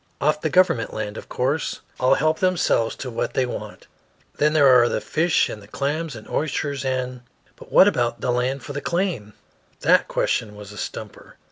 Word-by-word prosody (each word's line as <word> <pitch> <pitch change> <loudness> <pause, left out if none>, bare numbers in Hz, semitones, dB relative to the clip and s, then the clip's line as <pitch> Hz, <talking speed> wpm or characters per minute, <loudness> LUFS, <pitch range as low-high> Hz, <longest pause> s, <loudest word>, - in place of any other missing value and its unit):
"Off 150 +1 +1
the 160 - 0
government 170 -9 +2
land, 105 -1 -4
of - - -9
course. 140 +5 -1 0.2
All 130 +1 +4
help 155 +1 +1
themselves 180 -11 +1
to 130 - -6
what 115 - -3
they 130 - +2
want. 125 - -7 0.5
Then 150 +1 +2
there 150 -2 +5
are 125 -2 +6
the - - -1
fish 165 +1 +1
and 105 - -7
the 100 - -15
clams 145 +5 -3
and 110 - -11
oysters, 145 -2 -2
and 130 -1 -2 0.2
" - - -35
"But - - -15
what 190 - +7
about 120 -12 0
the 125 - -1
land 125 +2 -1
for 145 - -7
the 145 - -4
claim?" 170 - -2 0.5
That - - +4
question 105 -2 -1
was 105 -1 -10
a 105 - -11
stumper. - - -8
135 Hz, 200 wpm, -23 LUFS, 120-155 Hz, 0.5 s, what